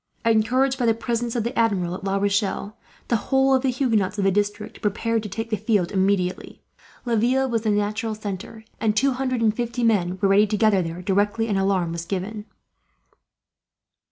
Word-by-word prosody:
Encouraged 250 +4 +2
by 240 - +1
the 225 - +3
presence 235 0 -2
of 235 - 0
the 235 +3 -4
Admiral 195 -7 +1
at 185 - -7
La 195 0 -1
Rochelle, 200 +1 -1 0.3
the 235 - +2
whole 270 0 +4
of 260 - +3
the 265 - +1
Huguenots 225 -7 0
of 200 - 0
the 195 - +3
district 205 +2 -2
prepared 225 +2 0
to 210 - -7
take 225 +4 -5
the 215 - +1
field, 205 -5 0
immediately. 190 -2 -1 0.4
Laville 245 +3 +2
was 230 -3 -1
the 220 - -1
natural 210 +1 -1
centre, 210 +1 -7 0.2
and 215 -1 0
two 275 +4 +3
hundred 255 -1 -2
and 220 -1 +2
fifty 240 0 -2
men 190 -5 +2
were 200 - +2
ready 205 +2 +5
to 210 - -1
gather 210 -3 +3
there, 170 +1 -5
directly 205 +4 +1
an 205 - 0
alarm 190 -3 +1
was 170 0 -5
given. 205 +3 -4
215 Hz, 190 wpm, -23 LUFS, 195-230 Hz, 0.4 s, ready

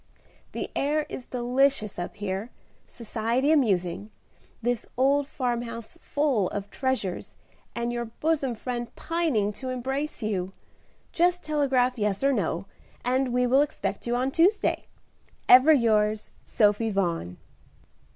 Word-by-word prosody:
"The - - -4
air 295 +2 +1
is 250 - -7
delicious 250 -4 +1
up 175 - -5
here, 205 +1 -4 0.4
society 235 +5 -1
amusing, 200 - +1 0.5
this 240 -1 -1
old 275 +2 +3
farmhouse 240 -4 -3
full 275 -10 +1
of 200 0 -5
treasures, 260 -9 -2 0.4
and 235 0 -2
your 240 0 -2
bosom 270 +2 -1
friend 240 +1 -5
pining 305 -12 0
to 260 +4 -6
embrace 265 +2 -3
you. 190 -3 -2 0.6
Just 355 +1 +2
telegraph 265 -5 +1
yes 210 +2 0
or 275 0 +4
no, 185 -4 -1 0.4
and 255 +1 +1
we 250 +1 +2
will 260 +3 +4
expect 295 -4 -3
you 240 - +1
on 255 +2 0
Tuesday. 365 +8 +2 0.6
"Ever 255 +5 +8
yours, 215 -5 +2
"SOPHIE 210 +1 +2
VAUGHAN." 170 - -1
245 Hz, 125 wpm, -26 LUFS, 210-275 Hz, 0.6 s, Ever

